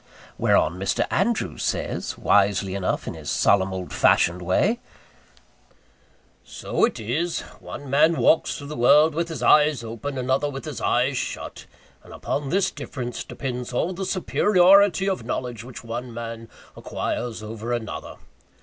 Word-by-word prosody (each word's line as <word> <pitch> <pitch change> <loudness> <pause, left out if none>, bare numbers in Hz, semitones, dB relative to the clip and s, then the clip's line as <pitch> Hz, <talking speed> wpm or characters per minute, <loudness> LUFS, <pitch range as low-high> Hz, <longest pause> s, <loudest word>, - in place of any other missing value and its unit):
Whereon 85 +4 +2
Mr. 95 - 0
Andrews 190 - 0
says, - - -2
wisely 100 -1 +2
enough, 95 -1 -2
in - - -3
his - - -7
solemn 95 -1 +3
old 95 -1 -6
fashioned 90 +2 +3
way, 190 - +1 1.6
"So - - 0
it 230 - -4
is. 155 +11 -2 0.2
One 145 - -9
man 155 +5 +4
walks 160 - +3
through 145 0 -9
the 150 - -5
world 150 +6 +5
with 170 +2 -2
his 160 - -5
eyes 150 -4 +4
open, 115 +5 -5
another 130 +3 0
with 135 -2 -7
his - - -6
eyes - - +1
shut; - - -5 0.4
and - - -13
upon 140 -1 -3
this 195 +4 +1
difference 125 -4 -6
depends 125 -2 -5
all 170 +9 0
the 190 +2 -4
superiority 195 +1 +4
of 190 -11 -1
knowledge 120 -1 -4
which 125 0 -10
one 120 +2 -5
man 115 -1 -7 0.3
acquires 115 -3 -4
over 110 +2 -6
another. 120 -3 -4
125 Hz, 150 wpm, -24 LUFS, 115-160 Hz, 1.6 s, world